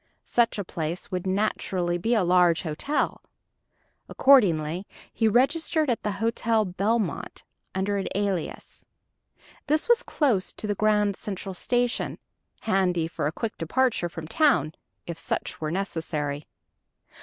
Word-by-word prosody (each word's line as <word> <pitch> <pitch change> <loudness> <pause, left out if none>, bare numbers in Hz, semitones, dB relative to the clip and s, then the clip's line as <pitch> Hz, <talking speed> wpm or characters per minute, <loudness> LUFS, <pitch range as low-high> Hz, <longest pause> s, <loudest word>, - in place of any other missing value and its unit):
Such 235 -2 +2
a 205 - -2
place 170 +1 -5
would 185 0 -2
naturally 185 -3 0
be 230 +7 +1
a 215 - +3
large 175 -1 +4
hotel. 170 - -1 0.9
Accordingly 180 - +4 0.3
he 225 - +2
registered 295 +5 +2
at 235 - -1
the 210 - -2
Hotel 225 0 +1
Belmont 205 +4 -1 0.3
under 200 +2 0
an 195 - -2
alias. 195 -4 -3 0.8
This 305 +2 +1
was 475 0 +5
close 250 - 0
to - - -6
the 205 - 0
Grand 210 -1 +2
Central 195 -1 -5
Station 245 +5 -1 0.4
handy 180 -5 +1
for 165 - -2
a - - -1
quick 220 +6 -4
departure 220 +1 +1
from 165 -1 -7
town, 280 - +3 0.3
if 170 -1 -5
such - - -3
were 155 - -1
necessary. 155 -5 -3
195 Hz, 130 wpm, -26 LUFS, 175-230 Hz, 0.9 s, was